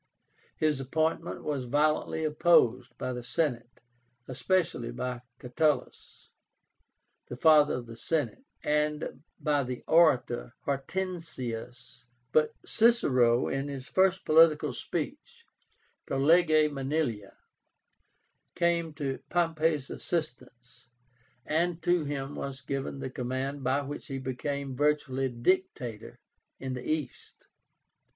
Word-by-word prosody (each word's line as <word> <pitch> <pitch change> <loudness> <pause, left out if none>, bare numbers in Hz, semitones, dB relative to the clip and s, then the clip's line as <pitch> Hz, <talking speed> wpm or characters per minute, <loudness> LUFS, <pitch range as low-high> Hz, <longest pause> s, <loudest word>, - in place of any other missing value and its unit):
His 155 -3 +1
appointment 160 +5 -1
was 140 -4 -2
violently 150 +4 +1
opposed 140 -6 +3
by 130 - -3
the 125 0 -6
Senate, 125 -3 -2 0.5
especially 160 -2 0
by 125 0 -4 0.2
CATULUS, 150 +5 -2 1.0
the 120 - -7
"father 150 +1 +5
of 125 -1 -5
the 115 -1 -10
Senate," 150 - -2 0.2
and 150 -2 -1 0.2
by 145 -2 +1
the 125 -1 -5
orator 130 -7 +3
HORTENSIUS; 135 -8 -4 0.3
but 155 +3 +2
CICERO 130 - +4
with 135 +1 -2
his 135 -2 -6
first 190 0 +2
political 155 -3 +5
speech - - -5 0.6
(Pro 135 - -1
Lege 155 +1 +4
Manilia) 135 -7 -2 1.2
came 170 -2 +1
to 140 -3 -3
Pompey's 160 -4 +1
assistance, 125 -6 -5 0.6
and 170 +2 0
to 175 -3 +2
him 140 -1 -4
was 140 -1 -5
given 135 +1 -4
the 130 - -4
command 130 +3 -3
by 130 +3 +1
which 145 +1 -7
he 135 - -4
became 135 +1 -4
virtually 135 -2 +1
dictator 120 - -1 0.4
in 130 -1 -4
the 125 -1 -6
East. 150 -5 -5
140 Hz, 110 wpm, -29 LUFS, 125-160 Hz, 1.2 s, father